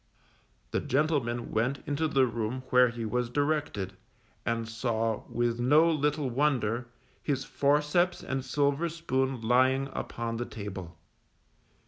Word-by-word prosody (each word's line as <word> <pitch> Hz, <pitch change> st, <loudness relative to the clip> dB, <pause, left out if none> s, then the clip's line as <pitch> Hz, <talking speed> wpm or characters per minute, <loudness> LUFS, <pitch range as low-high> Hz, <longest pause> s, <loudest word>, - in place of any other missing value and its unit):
_ -, -, -38 dB
The -, -, +1 dB
gentleman 130 Hz, -5 st, 0 dB
went 120 Hz, +5 st, 0 dB
into 145 Hz, +2 st, 0 dB
the 135 Hz, -3 st, +3 dB
room 115 Hz, +2 st, -3 dB
where 125 Hz, -1 st, +6 dB
he 115 Hz, -1 st, -5 dB
was 120 Hz, +2 st, -1 dB
directed, 145 Hz, -9 st, -1 dB, 0.5 s
and 115 Hz, -1 st, 0 dB
saw, 115 Hz, -1 st, -1 dB
with 120 Hz, 0 st, 0 dB
no 150 Hz, +7 st, +5 dB
little 150 Hz, -1 st, 0 dB
wonder, 125 Hz, -3 st, 0 dB, 0.3 s
his 135 Hz, -2 st, -1 dB
forceps 150 Hz, +5 st, +2 dB
and 135 Hz, -1 st, -2 dB
silver 145 Hz, +4 st, +1 dB
spoon 135 Hz, -6 st, -1 dB
lying 130 Hz, +4 st, +3 dB
upon 115 Hz, 0 st, -4 dB
the 120 Hz, -, -2 dB
table. 95 Hz, -6 st, -7 dB
130 Hz, 130 wpm, -29 LUFS, 115-145 Hz, 0.5 s, where